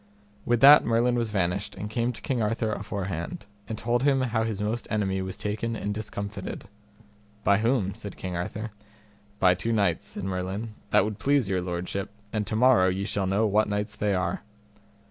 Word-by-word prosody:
With 120 -1 +2
that 145 +2 +10
Merlin 115 +2 +2
was 120 -2 0
vanished, 100 -1 -1
and 105 - -5
came 115 +3 0
to 110 - -11
King 125 -3 0
Arthur 110 0 0
aforehand, 95 -1 -4 0.2
and 110 - -4
told 120 +2 0
him 135 -1 +3
how 120 -3 0
his 110 -3 -2
most 110 +3 -2
enemy 95 -3 0
was 95 0 -4
taken 110 +2 -2
and 105 -1 -2
discomfited. 105 -1 -5 0.8
By 100 +2 +4
whom? 115 -4 +1
said 100 - -8
King 90 -2 -4
Arthur. 105 +6 -4 0.7
By 90 -2 +5
two 100 +6 -2
knights, 100 -7 +1
said - - -6
Merlin, 95 +4 -3 0.2
that 95 - +4
would 105 -1 -4
please 140 -6 +2
your 95 -1 +1
lordship, 90 +2 -3 0.2
and 105 -2 -1
to 110 - -2
morrow 120 -5 +5
ye 95 +2 -1
shall 100 -2 -1
know 100 +4 +2
what 105 +1 +2
knights 105 +1 -2
they 105 -2 0
are. 90 -1 -1
105 Hz, 185 wpm, -27 LUFS, 95-115 Hz, 0.8 s, that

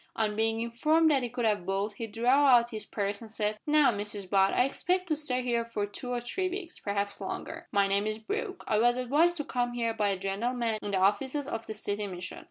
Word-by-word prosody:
On 215 -2 0
being 225 +1 +1
informed 310 +8 +3
that 275 -3 +3
he 245 - -3
could 240 0 -2
have 210 -4 +1
both, 195 +3 -1
he 225 +2 -5
drew 225 +2 -5
out 250 -2 +5
his 215 -2 -6
purse 200 0 -2
and 225 -2 -10
said 215 -1 -2
"Now, 300 -3 +5
Mrs 205 -2 -4
Butt, 195 0 +3
I 250 - +3
expect 365 +6 0
to 310 - +2
stay 255 -4 0
here 235 -1 +1
for 230 -3 -3
two 205 +5 -8
or 245 - 0
three 370 +10 -2
weeks 360 -2 -6
perhaps 200 0 -2
longer. - - -6
My 200 0 +3
name 200 +2 +1
is 215 0 -2
Brooke. 400 - -4
I 215 - +2
was 240 +2 +3
advised 300 +8 +2
to 295 - -2
come 245 -3 -1
here 230 -1 -1
by 210 -2 +1
a 195 - 0
gentleman 220 +4 -1
in 205 - -4
the 200 - 0
offices 255 +9 +1
of 225 -5 -5
the 220 - -5
City 205 0 -3
Mission. 180 -2 -6
230 Hz, 240 wpm, -29 LUFS, 205-260 Hz, -, out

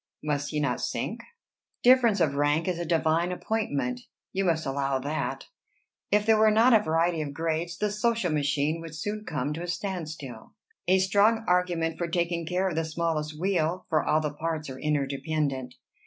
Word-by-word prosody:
Must 145 -1 -1
he 150 - -2
not 140 -4 0
sink?" - - -3 0.6
"Difference 245 -5 +5
of 155 -5 +2
rank 145 +4 +1
is 180 -2 -1
a 175 - -2
divine 165 +1 +1
appointment, 145 - -2 0.3
you 195 - 0
must 165 -2 +1
allow 135 0 0
that. 145 +4 -3 0.6
If 210 0 +2
there 220 -1 +4
were 220 0 +6
not 225 +4 +5
a 220 - +6
variety 165 -1 +1
of 145 -2 -5
grades, 165 +1 -2
the 210 -1 0
social 210 -3 0
machine 150 +2 0
would 165 -1 -8
soon 210 +6 -4
come 145 -3 -2
to 165 - -5
a 175 - -5
stand 175 -2 -3
still." 135 -7 -9 0.3
"A 185 +1 +5
strong 205 +4 +3
argument 175 -2 +1
for 170 - -1
taking 170 -1 -1
care 180 +2 0
of 185 - -2
the 165 - +1
smallest 155 -1 -2
wheel, 180 -2 0
for 155 -2 +2
all 155 - +2
the 150 -1 -2
parts 155 -2 -3
are 130 - -8
interdependent. 140 -2 -1
165 Hz, 185 wpm, -27 LUFS, 150-185 Hz, 0.6 s, were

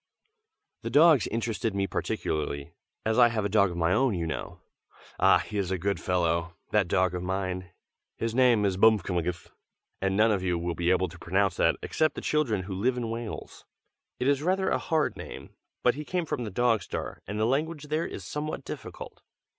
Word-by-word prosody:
The - - -4
dogs 155 -4 +6
interested 115 -2 -2
me 100 0 +1
particularly, 75 -5 -3 0.3
as 110 0 +2
I - - +8
have 110 -3 -1
a - - 0
dog 100 -1 +4
of 85 - -6
my 85 +1 +2
own, 130 -3 +2
you 85 -2 -2
know. 80 - -5 0.6
Ah! - - +6
he 105 -1 -4
is 95 -3 -1
a 95 - 0
good 100 +3 -1
fellow, 85 -1 0 0.2
that 105 -4 +3
dog 90 +1 +2
of 90 - -3
mine! 90 -1 -3 0.5
His 115 -1 -2
name 120 -4 +4
is 95 -2 0
Bmfkmgth, 90 -5 +2 0.5
and 95 0 0
none 110 +1 +5
of 100 -3 +1
you 90 -2 0
will 85 +1 -2
be 85 +1 0
able 95 0 +3
to 85 +1 -12
pronounce 95 +3 +1
that, - - +3
except 155 -1 +1
the - - -5
children 120 -11 0
who 95 +1 -6
live 120 +7 0
in 115 -2 -2
Wales. 115 -1 -6 0.6
It 125 - 0
is 140 0 +3
rather 190 +3 +1
a - - +2
hard 160 -3 0
name, - - -9 0.3
but 125 - +4
he 150 - -6
came 180 +2 -2
from 125 -5 -3
the - - -4
Dog 115 +1 +2
Star, - - -5
and 105 +2 -4
the 110 - +2
language 150 +4 -1
there 155 +2 0
is - - -8
somewhat 150 +1 -4
difficult. - - -8
105 Hz, 200 wpm, -28 LUFS, 90-125 Hz, 0.6 s, I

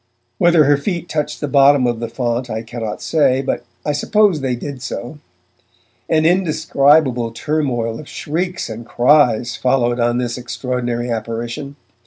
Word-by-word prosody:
Whether 170 -2 +5
her 145 0 +4
feet 175 +3 -3
touched 150 -2 -3
the 150 - -1
bottom 140 -1 +5
of 120 -2 -1
the 115 -1 -4
font 120 0 -2
I 110 0 -4
cannot 115 -2 -6
say, 135 -4 +2
but - - -2 0.2
I 150 - +1
suppose 195 +2 +2
they 130 -2 -1
did 135 +1 -7
so. 130 +3 -6 0.9
An 155 -1 +2
indescribable 155 -7 +2
turmoil 120 -3 -2
of 155 - -11
shrieks 180 +4 -3
and 110 +1 -7
cries 120 -2 +3
followed 120 -2 +1
on 120 0 +1
this 125 0 -2
extraordinary 120 -1 -3
apparition. 115 +5 -4
130 Hz, 150 wpm, -18 LUFS, 120-150 Hz, 0.9 s, Whether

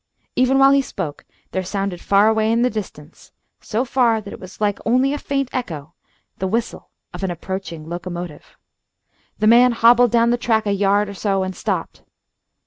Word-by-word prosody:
Even 255 +1 +3
while 270 0 +6
he 275 0 +4
spoke 150 - -6 0.3
there 190 - -1
sounded 195 -1 -3
far 200 +1 +4
away 220 0 +2
in 230 +1 +2
the 250 - +2
distance, 175 -7 -8 0.3
so 230 +4 -2
far 240 -3 +2
that 205 -2 -9
it - - -10
was 185 0 -12
like 205 -1 0
only 255 +4 +2
a 295 - -3
faint 275 -1 -2
echo, 160 - -5 0.5
the 190 - -1
whistle 230 +4 -3 0.2
of - - -7
an 190 - 0
approaching 175 -2 -6
locomotive. 175 -2 -7 0.8
The 215 - 0
man 240 +2 +6
hobbled 235 +1 +5
down 235 +1 +3
the 240 - +2
track 220 -2 +1
a 205 - 0
yard 200 +1 +2
or 200 - -7
so 195 -1 -1
and 185 0 -4
stopped. - - -3
215 Hz, 185 wpm, -20 LUFS, 190-240 Hz, 0.8 s, while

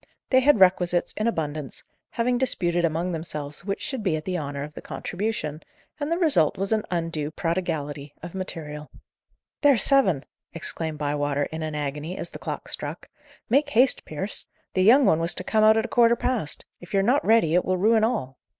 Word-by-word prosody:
They 260 - +6
had 275 -3 +4
requisites 180 -2 +3
in 215 - -1
abundance, 155 - -2 0.3
having 245 +1 +1
disputed 175 -9 0
among 165 +2 0
themselves 155 -2 -4
which 195 -1 -3
should 265 -4 -3
be 185 -6 +1
at 155 - -5
the 185 - -2
honour 140 -4 -3
of 150 +1 -8
the - - -9
contribution, 180 -6 -4 0.4
and 290 +2 -3
the 335 - +2
result 290 - +3
was 195 +2 -2
an 215 -1 +1
undue 165 -4 -2
prodigality 155 -4 -3
of 175 - -7
material. 155 -6 -6 0.7
"There's 280 -8 +5
seven!" 190 - +3 0.3
exclaimed 160 -1 -2
Bywater 145 -1 -1
in 160 +2 -5
an 155 -1 -3
agony, 150 +4 -4
as - - -3
the - - -9
clock - - -5
struck. - - -6 0.4
"Make 285 +3 +2
haste, 255 0 +3
Pierce! 190 +7 -3 0.3
the 185 - +1
young 250 +8 +6
one 160 - +4
was 165 0 +1
to - - -4
come 215 +3 +2
out 220 +1 +6
at 220 - +1
a - - -3
quarter 235 0 +4
past. 235 - -2
If 175 +3 -7
you're 195 - +3
not 250 +7 +3
ready, 220 -8 +4
it 180 - +4
will 185 0 0
ruin 220 +3 +3
all." 215 - -1
175 Hz, 195 wpm, -25 LUFS, 155-225 Hz, 0.7 s, They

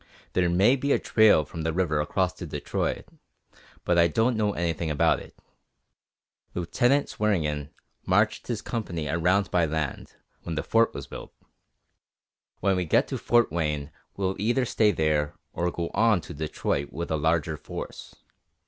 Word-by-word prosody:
There 90 -1 +2
may 95 +9 +4
be 140 +1 -1
a - - +4
trail 110 -9 +4
from 80 - -7
the 80 +1 0
river 80 -3 +1
across 90 +4 0
to 90 -1 -8
Detroit, 75 -1 -3 0.8
but 85 -1 +3
I 85 - +6
don't 115 +9 +1
know 105 -2 +1
anything 85 -2 -2
about 75 - +2
it. - - -14 1.2
Lieutenant 120 +11 +2
Swearingen 75 -9 -1 0.4
marched - - +2
his - - -3
company 85 -9 -3
around 90 +5 +1
by 85 -2 +3
land, 75 -3 -4 0.3
when 85 - -5
the 75 - -2
Fort 115 0 +2
was - - -5
built. - - -9 1.3
When 95 -1 +2
we 90 - 0
get 80 - +3
to - - -2
Fort 120 -5 +3
Wayne, 75 -3 -2 0.3
we'll 95 -1 -1
either 120 +5 +1
stay 110 -2 +3
there, 75 -3 0 0.2
or 90 +1 0
go 85 -1 -4
on 110 -2 +4
to - - -9
Detroit 70 -1 -2
with 85 +2 -5
a - - +2
larger 80 0 +1
force. - - -8
85 Hz, 160 wpm, -26 LUFS, 80-105 Hz, 1.3 s, I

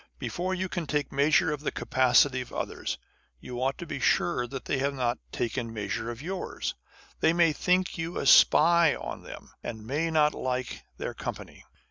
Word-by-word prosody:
Before 185 +1 -2
you 185 0 -2
can 175 -3 -4
take 145 -1 -1
measure 150 +4 +3
of 145 - -5
the 150 - -2
capacity 130 +1 +3
of 125 - -9
others, - - -4 0.4
you 125 - -6
ought 135 +1 0
to 175 - -7
be - - -5
sure 125 -8 +1
that 135 +1 -7
they 135 - 0
have 140 +1 0
not 125 -2 -1
taken 115 0 -2
measure 110 +1 -3
of 120 +3 -7
yours. 185 +2 -4 0.5
They 160 - +3
may 170 -2 +4
think 180 +2 +1
you 165 +2 -3
a - - -2
spy 170 +3 +6
on - - -6
them, - - -11
and 110 -2 -6
may 150 +7 -1
not 150 -2 +3
like 130 -1 -3 0.2
their - - -4
company. - - -7
140 Hz, 185 wpm, -28 LUFS, 125-165 Hz, 0.5 s, spy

